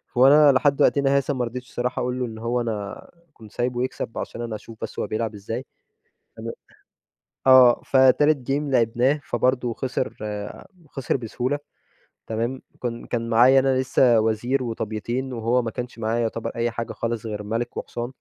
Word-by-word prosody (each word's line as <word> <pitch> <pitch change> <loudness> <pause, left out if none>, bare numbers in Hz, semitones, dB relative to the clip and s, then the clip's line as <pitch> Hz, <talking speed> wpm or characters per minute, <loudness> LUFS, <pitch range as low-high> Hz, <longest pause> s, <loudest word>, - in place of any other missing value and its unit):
وأنا 140 +3 +7
لحد 140 +1 +2
وقتنا 140 -1 +3
هذا 140 +1 0
ما 125 -2 -1
رضيتش 125 +1 -7
الصراحة 125 +1 -2
أقول 125 +1 -2
له 125 - 0
إن 110 -1 -8
هو 120 +2 -1
أنا 105 -3 -5 0.3
كنت 110 -2 -15
سايبه 125 +1 -1
يكسب 130 -3 -5
عشان 120 - -5
أنا 115 -2 -4
أشوف 110 +1 -11
بس - - -5
هو - - -1
بيلعب 110 0 -2
إزاي، 115 +6 -5 0.7
تمام. - - -5 0.9
آه 130 -2 +7
فتالت 135 +1 +4
game - - +3 0.2
لِعبناه، 125 +5 +2
فبرضو 125 0 0
خِسر، 130 0 -2 0.8
خِسر 135 -1 -2
بسهولة، 125 +4 -2 0.7
تمام؟ 115 +4 -2 0.2
كن 120 -1 -4
كان 115 -1 -3
معايا 125 +4 +6
أنا 130 -1 +2
لسّه 125 -3 +4
وزير 120 +5 0
وطَبْيتين، 120 +3 -3
وهو 120 +2 +1
ما 115 -1 -4
كانش 125 -1 -6
معاه 110 +1 -1
يُعتبر 115 0 -2
أي 115 0 0
حاجة 115 0 -5
خالص 115 0 -3
غير 105 -1 -4
مَلِك 115 +3 -3
وحصان. 120 +1 -4
120 Hz, 165 wpm, -23 LUFS, 115-130 Hz, 0.9 s, وأنا